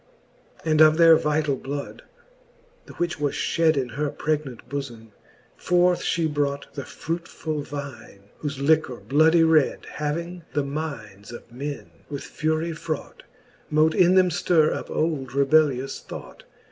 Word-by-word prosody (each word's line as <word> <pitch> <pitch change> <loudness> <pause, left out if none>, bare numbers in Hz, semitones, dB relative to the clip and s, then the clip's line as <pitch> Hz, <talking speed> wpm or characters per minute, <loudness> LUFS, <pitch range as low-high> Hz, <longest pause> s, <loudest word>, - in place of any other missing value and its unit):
XI. 160 - -1
And 155 0 +4
of 155 0 +7
their 165 -1 +8
vitall 150 -2 0
bloud, 140 +2 -6 0.9
the - - -11
which 175 -3 -2
was 145 -1 -1
fhed 160 -2 +2
Into 125 -4 -2
her 150 0 0
pregnant 150 -4 -3
bofome, 120 -6 -6 0.4
forth 180 0 +2
fl:ie 165 -1 0
brought 145 -2 -2
The 140 - -6
fruitfull 160 -2 -4
vine, 140 -9 -8 0.2
whofe 145 -2 -3
liquor 145 -2 +2
bloudy 155 +10 +3
red 160 -3 +3
Having 170 +4 -4
the 145 - +1
mindes 140 -9 -6
of 120 - -11
men 140 +4 -6 0.2
with 140 -2 -5
fury 160 +2 -2
fraught. 155 -1 -6 0.5
Mote 155 +1 +3
in 180 +2 +4
them 185 -1 +5
ftirre 165 -2 +2
up - - -6
old 140 -5 -2
rebellious 140 -2 +2
thought. - - -10
150 Hz, 145 wpm, -24 LUFS, 140-160 Hz, 0.9 s, their